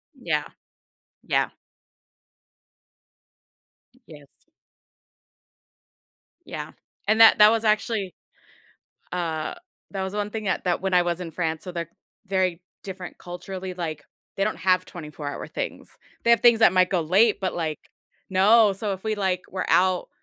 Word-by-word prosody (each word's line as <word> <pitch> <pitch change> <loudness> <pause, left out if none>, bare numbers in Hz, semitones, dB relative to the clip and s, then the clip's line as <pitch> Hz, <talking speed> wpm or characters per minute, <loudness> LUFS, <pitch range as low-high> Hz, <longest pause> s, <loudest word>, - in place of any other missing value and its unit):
Yeah, - - -1 0.8
yeah. - - +1 2.6
Yes. 145 -3 -17 2.0
Yeah, - - -6 0.4
and 220 +2 +4
that 225 - +9
that 210 0 +8
was 225 0 0
actually 215 -2 0 1.0
uh, 165 -3 -2 0.4
that 195 -1 -3
was 190 +1 -4
one 205 0 -2
thing 220 0 -5
that 190 - -1
that 180 - 0
when 190 0 -1
I 180 - +6
was 175 0 -1
in 170 -2 -6
France, 160 -1 -2
so 180 - -6
they're 170 -2 -5 0.4
very 185 -2 0 0.2
different 185 -2 -8
culturally, 185 +1 -7
like, 160 -4 -5 0.3
they 195 - +1
don't 215 - -1
have 185 -1 +2
twenty-four-hour 150 -4 -7
things, - - -5 0.3
they 235 - +1
have 235 -2 +5
things 235 -2 +6
that 225 - +6
might 185 0 +4
go 180 -3 +1
late, 195 +8 +3
but 190 -1 -2
like 160 -3 -3 0.5
No, 205 +3 +5
so, 200 +1 -3
if 190 - -9
we, 220 -1 -1
like, 190 -3 0
were 190 - -3
out, 185 0 +3
185 Hz, 140 wpm, -24 LUFS, 175-205 Hz, 2.6 s, that